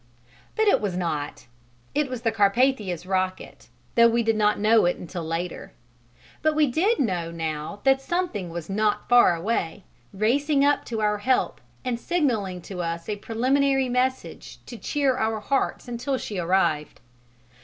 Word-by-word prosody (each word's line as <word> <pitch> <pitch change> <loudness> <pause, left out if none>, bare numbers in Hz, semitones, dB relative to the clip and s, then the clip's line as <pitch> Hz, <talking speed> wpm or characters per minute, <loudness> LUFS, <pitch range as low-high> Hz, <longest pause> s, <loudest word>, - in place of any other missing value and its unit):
But 440 0 +2
it - - +4
was 195 -4 -2
not: 155 -5 -3 0.5
it 295 -2 0
was 250 -2 -5
the 225 - +2
Carpathia's 205 -4 +1
rocket, 185 0 -3 0.2
though 235 0 +6
we 235 0 +1
did 225 0 +1
not 210 0 +2
know 220 0 +4
it 175 - +1
until 175 0 -6
later. 165 +2 -4 0.7
But 310 0 +2
we 305 0 +4
did 360 - +1
know 180 -9 0
now 160 +3 -5
that 270 0 +4
something 300 - -2
was 165 -1 -6
not 210 +1 0
far 240 -7 +6
away, 180 0 -2 0.3
racing 275 +8 +2
up 290 0 +2
to 225 -2 -3
our 210 -1 +1
help 255 +4 0 0.2
and 240 -2 -1
signalling 225 - -1
to 185 -3 -6
us 170 0 -4
a 210 - -2
preliminary 265 +5 +1
message 255 +1 -2
to 240 - -9
cheer 270 +2 0
our 220 -1 0
hearts 270 +3 -1
until 245 +3 -2
she 205 -6 -5
arrived. 170 -4 0
220 Hz, 160 wpm, -25 LUFS, 180-260 Hz, 0.7 s, though